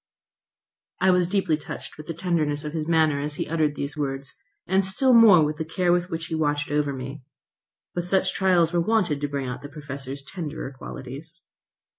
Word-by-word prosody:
I 190 +1 +5
was 180 -1 +3
deeply 190 -5 +1
touched 150 - -8
with 150 - -11
the 165 - -4
tenderness 155 -4 0
of 150 - -4
his 155 -2 -2
manner 160 -4 +3
as 150 +1 -3
he - - -3
uttered 155 -2 +1
these 140 +1 -4
words, 135 -2 -3 0.3
and 190 +2 +2
still 230 +8 +3
more 210 -9 +8
with 150 +1 -2
the 160 - -2
care 175 +2 +1
with 175 +1 0
which 165 -1 -3
he - - -6
watched 145 -2 0
over 145 -1 +1
me. 135 +2 -6 0.7
But 175 0 -2
such 190 +1 +2
trials 180 -3 +3
were 175 - +3
wanted 180 -7 +1
to 145 - 0
bring 140 -2 -3
out 125 0 -5
the 145 - -8
Professor's 140 -2 -7
tenderer 155 -4 -6
qualities. 140 +5 -9
155 Hz, 195 wpm, -25 LUFS, 145-175 Hz, 0.7 s, more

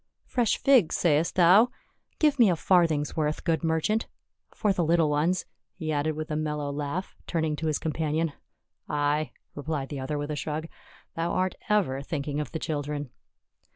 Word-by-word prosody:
" - - -52
Fresh 240 -4 +1
figs, 255 - +4
sayest 160 -1 +2
thou? 185 +7 +6 0.5
Give 300 -3 +2
me 230 -4 +7
a 175 - +3
farthing's 160 -4 +2
worth, 155 -2 -1
good 165 -1 0
merchant. 165 +8 +1 0.4
For 210 -3 0
the 180 - 0
little 165 -1 +3
ones," 165 +5 +1 0.3
he 160 -3 -3
added 155 +1 0
with 155 0 -5
a - - 0
mellow 150 -2 -2
laugh, 145 +6 -4
turning 160 -3 0
to 160 - -2
his 155 - +1
companion. 160 0 -1 0.6
"Ay!" 150 0 +1 0.2
replied 145 -2 -3
the 145 - -5
other 135 +3 -3
with 145 +1 -3
a - - -2
shrug, 155 +2 -3 0.5
"thou 165 +1 -1
art 185 0 +1 0.2
ever 180 -11 +2
thinking 145 0 -3
of 150 - -4
the - - -3
children." 145 -3 -3
155 Hz, 175 wpm, -27 LUFS, 150-175 Hz, 0.6 s, me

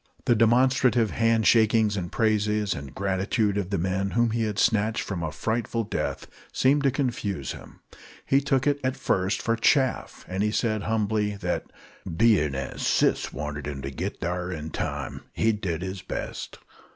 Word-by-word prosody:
The - - +4
demonstrative 120 0 +3
hand 115 -1 +2
shakings 110 -2 +4
and 90 -3 -4
praises 105 -2 +1
and 70 -2 -8
gratitude 100 +2 0
of 100 -3 -2
the 100 - 0
men 95 +3 -1
whom 120 -1 +3
he 115 0 0
had 105 -2 -3
snatched 110 0 +2
from 95 -4 -4
a 80 -2 -2
frightful 115 +8 -2
death - - -3 0.3
seemed 140 +3 +3
to - - +6
confuse 120 - -2
him. - - -11 0.4
He 135 +1 +3
took 135 -2 +1
it 145 -1 +2
at 130 +1 -1
first 95 -6 0
for 115 - +1
chaff, 130 +3 +1
and 105 +3 -1
said, 110 -2 0
humbly, 105 -1 0
that 90 -3 -2 0.5
"Bein' 90 -12 +3
as 65 0 -5
sis - - +2
wanted 75 +1 -5
him 70 -2 -5
to 70 - -4
git 65 - -5
thar 90 +1 -2
in 80 -2 -5
time, - - -4
he'd 110 -2 +1
did 85 -2 -2
his 95 0 -5
best." - - -6
105 Hz, 170 wpm, -26 LUFS, 90-115 Hz, 0.5 s, to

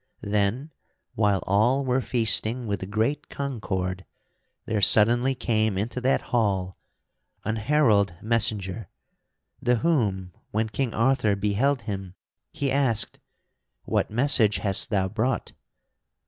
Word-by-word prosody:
Then, 105 +8 -1 0.4
while 105 -3 +1
all 120 +8 +2
were 130 +1 +1
feasting 120 0 +2
with 100 -3 -4
great 115 +9 -1
concord, 95 -9 -4 0.6
there 105 -1 -1
suddenly 120 +6 +3
came 110 -4 0
into 115 +5 -3
that 130 +2 +1
hall 95 -6 0 0.7
an 110 +2 -1
herald 110 - +2
messenger; 110 -3 -1 0.7
the 125 0 +2
whom, 105 - 0 0.2
when 110 +1 -1
King 120 +3 -2
Arthur 115 -3 +2
beheld 115 +6 0
him, 95 -3 -6 0.4
he 140 -2 -2
asked: 125 -5 +1 0.6
"What - - -1
message 115 -3 +2
hast 100 -2 +3
thou 95 -3 +1
brought?" 110 +4 -2
110 Hz, 115 wpm, -25 LUFS, 100-125 Hz, 0.7 s, suddenly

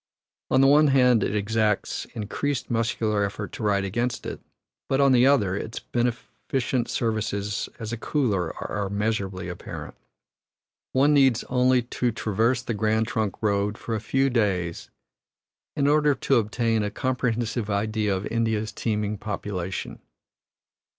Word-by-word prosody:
On 130 - +4
the - - +6
one 150 +2 +6
hand 125 -5 +4
it - - -1
exacts 105 0 0
increased 130 +6 -3
muscular 110 -2 0
effort 100 +1 -4
to - - -8
ride 100 -2 +1
against 120 +5 -2
it, - - -5 0.5
but 135 - +2
on 140 -1 +5
the 125 0 +5
other, 105 -10 +3
its 110 +2 -5
beneficent 120 +1 -2
services 105 -3 -1
as 115 0 -5
a - - -2
cooler 110 - -1
are 100 -2 -3
measurably 100 -3 -2
apparent. 90 -1 -7 1.0
One 140 +3 +4
needs 135 -5 +4
only 125 0 +3
to 120 0 -1
traverse 115 +3 0
the 120 - -2
Grand 110 +1 +1
Trunk 110 -2 -2
Road 105 0 +1
for 115 - -5
a 110 - -1
few 135 +4 +1
days 95 -8 -1 0.9
in 140 - +1
order 150 0 +4
to 135 0 +2
obtain 115 0 +1
a 105 - -1
comprehensive 120 -2 -1
idea 105 0 0
of 95 - -5
India's 110 -2 -1
teeming 105 -2 -2
population. 100 -4 -4
110 Hz, 145 wpm, -25 LUFS, 105-125 Hz, 1.0 s, the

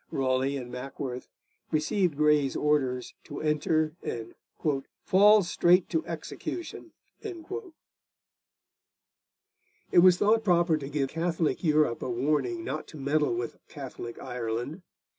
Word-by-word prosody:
Raleigh 135 +1 0
and 125 -2 -7
Mackworth 125 0 -6 0.4
received 160 +1 +1
Grey's 150 -2 +3
orders 135 -4 0
to - - -7
enter 155 +1 +1
and 115 -1 -5 0.7
'fall 205 +2 +6
straight 175 +1 +3
to 325 - +1
execution.' 350 - -6 0.3
It 360 -6 -7 2.6
was 180 0 +7
thought 220 +3 +3
proper 175 -4 +3
to 140 -2 -6
give 140 -2 -1
Catholic 165 +1 -1
Europe 150 -6 +2
a - - -3
warning 150 - 0
not 155 - -4
to 155 - -11
meddle 145 -1 +1
with 120 0 -4
Catholic 120 0 -8
Ireland. 125 +5 -4
150 Hz, 115 wpm, -28 LUFS, 130-175 Hz, 2.6 s, was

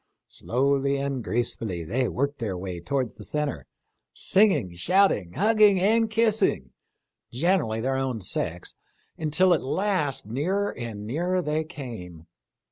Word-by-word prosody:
Slowly 140 +2 0
and 140 -3 -2
gracefully 110 -7 -2
they 125 +9 0
worked 140 +4 -2
their 105 -6 -3
way 90 -1 -5
towards 125 +7 -2
the 105 - -12
centre, 140 - -3 0.5
singing, 190 - +2
shouting, 130 - +2
hugging 210 -2 +4
and 220 +4 +3
kissing, 215 - +1 0.6
generally 125 -6 +1
their 130 +2 0
own 130 -3 -2
sex, 90 -2 -2 0.5
until 170 +4 +3
at 165 - +1
last 150 - -1
nearer 180 - -1
and 110 -4 -6
nearer 175 +9 -1
they 155 +1 0
came. 115 - -9
140 Hz, 125 wpm, -26 LUFS, 110-185 Hz, 0.6 s, hugging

